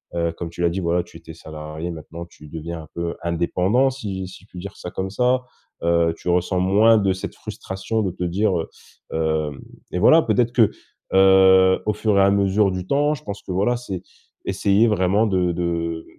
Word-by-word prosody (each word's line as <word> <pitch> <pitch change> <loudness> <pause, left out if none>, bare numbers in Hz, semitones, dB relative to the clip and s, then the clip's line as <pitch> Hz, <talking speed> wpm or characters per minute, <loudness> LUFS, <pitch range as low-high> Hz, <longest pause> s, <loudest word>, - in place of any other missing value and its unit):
Heu, 85 -1 0
comme 85 0 -6
tu 85 - -8
l'as 85 - +3
dit 90 +3 -3
voilà 85 0 0
tu 85 - -14
étais 80 - -12
salarié 80 +1 -7
maintenant 85 +1 -8
tu 75 -3 -16
deviens 80 +1 -6
un 75 - -14
peu 85 0 -3
indépendant, 90 +9 +1
si 100 -8 -5
si 95 +1 -13
je - - -28
puis - - -13
dire 100 +2 -8
ça 90 - -7
comme 95 0 -4
ça. 125 +3 +1 0.4
Heu, 85 -1 +2
tu - - -5
ressens 90 +1 +1
moins 105 +5 +5
de 100 -3 +2
cette 95 - -7
frustration 95 +4 -4
de 95 - 0
te 90 - -6
dire, 95 +4 +1
heu: 80 - -3 0.8
«hem» 70 - -11 0.3
et 90 - -2
voilà 160 - +6
peut-être 120 -1 +1
que, 110 -4 +4 0.4
heu, 95 -1 +6
au 105 - +1
fur 105 0 0
et - - +6
à 100 - +4
mesure 100 0 +2
du 95 0 -5
temps, 145 +2 +2
je - - -14
pense 100 -1 -7
que - - -7
voilà 100 +7 +1
c'est, 100 -7 -6 0.4
essayer 100 +4 +2
vraiment 100 +1 +2
de 90 -3 +1
de 85 -1 -2
95 Hz, 210 wpm, -22 LUFS, 85-105 Hz, 0.8 s, voilà